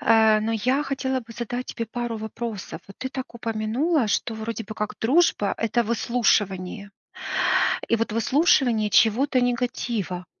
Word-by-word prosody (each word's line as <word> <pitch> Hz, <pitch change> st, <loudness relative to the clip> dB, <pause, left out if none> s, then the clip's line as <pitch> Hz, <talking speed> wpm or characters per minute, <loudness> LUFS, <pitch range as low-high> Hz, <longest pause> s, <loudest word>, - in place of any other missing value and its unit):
э, 220 Hz, -1 st, +5 dB
но 220 Hz, +1 st, -1 dB
я 255 Hz, +7 st, +1 dB
хотела 265 Hz, -1 st, -1 dB
бы 230 Hz, -1 st, -10 dB
задать 245 Hz, +2 st, -4 dB
тебе 230 Hz, -, -4 dB
пару 235 Hz, 0 st, -4 dB
вопросов. 220 Hz, -1 st, -6 dB
Вот 195 Hz, -, -13 dB
ты 260 Hz, -, -4 dB
так 260 Hz, -2 st, -7 dB
упомянула, 230 Hz, +6 st, 0 dB
что 225 Hz, +2 st, -1 dB
вроде 220 Hz, 0 st, -4 dB
бы 215 Hz, +1 st, -8 dB
как 210 Hz, 0 st, -3 dB
дружба- 255 Hz, -, +3 dB
это 230 Hz, +1 st, +1 dB
выслушивание. 210 Hz, -4 st, 0 dB, 1.0 s
И 230 Hz, -, +3 dB
вот 230 Hz, -1 st, -2 dB
выслушивание 235 Hz, -, +2 dB
чьего-то 250 Hz, +5 st, +4 dB
негатива. 235 Hz, -7 st, -2 dB
230 Hz, 145 wpm, -24 LUFS, 215-250 Hz, 1.0 s, э